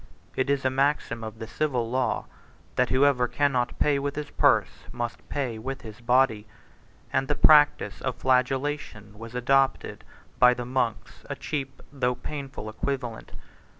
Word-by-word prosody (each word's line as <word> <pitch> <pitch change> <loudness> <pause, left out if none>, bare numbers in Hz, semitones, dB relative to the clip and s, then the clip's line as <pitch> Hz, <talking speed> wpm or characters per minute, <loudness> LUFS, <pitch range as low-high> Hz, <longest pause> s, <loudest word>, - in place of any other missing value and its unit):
It 130 +1 0
is 140 -1 0
a 130 - +3
maxim 135 -4 0
of 110 0 -7
the 110 - -6
civil 125 0 -1
law, 130 +2 -1 0.5
that 125 - +2
whosoever 130 -2 +3
cannot 130 -3 0
pay 145 -2 +2
with 140 0 -3
his 150 0 -5
purse, - - +2
must 120 -1 -5
pay 125 -6 -3
with 135 +4 -6
his 110 +1 -10
body; 120 -3 +2 0.7
and 135 0 +1
the 145 - 0
practice 145 -10 +5
of 130 -2 -2
flagellation 130 -5 -1
was 115 +1 -9
adopted 135 +2 +1 0.4
by 125 0 +6
the 125 - -5
monks, 120 -6 -2
a - - -3
cheap, 135 -3 -5
though 125 -3 0
painful 135 -5 -7
equivalent. 120 +1 -4
130 Hz, 150 wpm, -26 LUFS, 120-140 Hz, 0.7 s, by